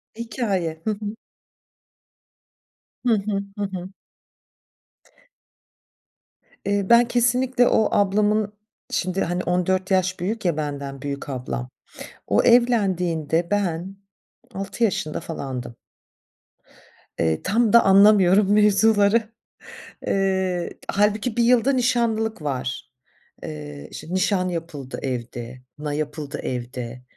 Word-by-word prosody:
Hikâye. 195 -9 -2
Hı - - +1
hı. 210 +1 -5 1.9
Hı 235 - +4
hı. 200 -1 -2
Hı 205 - -2
hı. 190 -2 -5 2.8
Eee, 200 0 +1
ben 235 0 +6
kesinlikle 245 +1 +2
o 220 - +3
ablamın 205 +1 +2 0.4
şimdi, 185 +1 -1
hani, 175 +1 -2
14 185 +2 0
yaş 185 -1 +1
büyük 205 +3 -3
ya, 165 -3 +1
benden 140 -2 -4
büyük 140 0 -5
ablam, 125 -1 -4 0.6
o - - +3
evlendiğinde 180 -9 +2
ben 190 -1 -1 0.6
6 195 +4 -2
yaşında 155 -7 -1
falandım. 130 -6 -6 1.5
Eee, 80 -1 +1
tam 225 +3 +2
da 235 - +8
anlamıyorum 200 0 +5
mevzuları. 210 +1 +4 0.8
Eee, 190 -2 0
hâlbuki 210 +3 +1
1 235 - +3
yıl 240 -1 +4
da 275 - +3
nişanlılık 230 - 0
var. 135 -3 -4 0.5
Eee, 75 -1 -8
şimdi 175 - -7
nişan 185 0 +1
yapıldı 165 -6 -6
evde, 120 -1 -5
kına 150 -1 -4
yapıldı 150 -1 -4
evde. 125 0 -5
190 Hz, 105 wpm, -23 LUFS, 150-215 Hz, 2.8 s, da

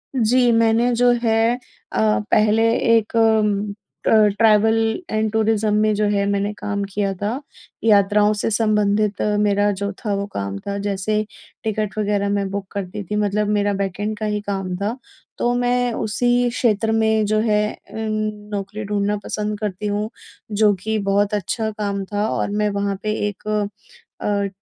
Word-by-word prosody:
जी। 245 +1 +3
मैंने 230 +1 +3
जो 245 +1 +4
है 225 +1 +3 0.4
अ, - - -1 0.3
पहले 215 +1 +4 0.3
एक 220 0 -3
अ, 210 -2 0 0.3
ट्रैवल 220 0 +4 0.3
एंड 215 0 0
टूरिज्म 220 -1 +1
में 215 0 +3
जो 210 +1 +1
है 200 -1 +1
मैंने 200 0 0
काम 205 -1 -3
किया 200 -1 0
था, 220 +6 -1 0.4
यात्राओं 210 -1 +4
से 210 +1 -1
संबंधित 210 -1 +1 0.2
मेरा 205 0 +2
जो 200 - -1
था 210 -3 -2
वो 200 0 -2
काम 100 0 -3
था, 200 - -4
जैसे 205 +1 -1 0.4
टिकट 215 -2 -2
वग़ैरह 205 -1 0
मैं 200 -1 0
बुक 200 0 -3
करती 200 +1 -5
थी, 205 +3 -4
मतलब 210 0 0
मेरा 205 0 +1
बैकएंड 200 +2 -2
का 215 - -2
ही 210 -1 -1
काम 195 -2 -2
था। 210 +6 -2 0.4
तो 240 - +1
मैं 245 -1 +1
उसी 245 +3 +1
क्षेत्र 225 -2 +1
मैं 220 -1 +2
जो 215 +1 +1
है 210 -1 +2
अ, - - -19
नौकरी 215 -1 -4
ढूँढना 205 0 0
पसंद 210 0 -3
करती 210 -1 -3
हूँ। 210 +1 -1 0.4
जो 210 0 +4
कि 220 0 0
बहुत 205 +1 +2
अच्छा 220 +2 -1
काम 200 -2 -2
था 205 +1 +1
और - - -1
मैं 210 0 +1
वहाँ 200 0 -1
पे 215 - 0 0.2
एक 205 0 -8 0.7
अ, 200 -1 0
210 Hz, 160 wpm, -21 LUFS, 200-220 Hz, 0.7 s, जो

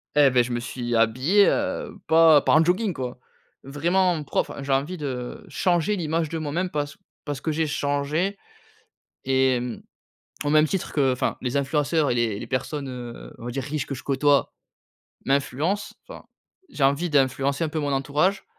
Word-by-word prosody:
eh 145 -2 +6
beh, 125 -1 +3
je 120 - -6
me 120 - -1
suis 120 0 -4
habillé, 130 - +4
heu, 280 -6 -2
pas 160 -2 +6
pas - - +1
en 155 - +6
jogging, 185 +4 +1
quoi. 130 -3 -5 0.5
Vraiment 170 +4 +1
propre, - - -1
enfin, - - -7
j'ai 140 0 0
envie 145 +7 -1
de 130 -5 -5
changer 175 +2 +1
l'image 165 -3 -1
de 165 - -3
moi-même 160 +4 -2
parce 145 -3 -3 0.3
parce 145 -3 -4
que 160 - -1
j'ai 160 +1 0
changé 150 +6 -1 0.9
et 130 -1 +2
mmh, 125 -2 -5 0.7
au 145 - +1
même 155 +1 +5
titre 190 +3 -3
que, 135 -3 +3
enfin, 125 - -1
les 125 0 -3
influenceurs 145 +2 +1
et 120 - +1
les 115 -4 0
les - - -7
personnes, 135 +2 -3
heu, 120 -2 -8
on 115 - -10
va 120 - -4
dire 135 +2 -3
riche 145 +1 -3
que - - -5
je 130 - -6
côtoie, 140 +1 +2 0.7
m'influencent, 140 +8 0
enfin, - - -10 0.5
j'ai 145 - -3
envie 140 +6 +1
d'influencer 135 0 +1
un - - -3
peu 155 +1 -3
mon 145 -1 -1
entourage 145 +8 0
145 Hz, 185 wpm, -24 LUFS, 130-160 Hz, 0.9 s, eh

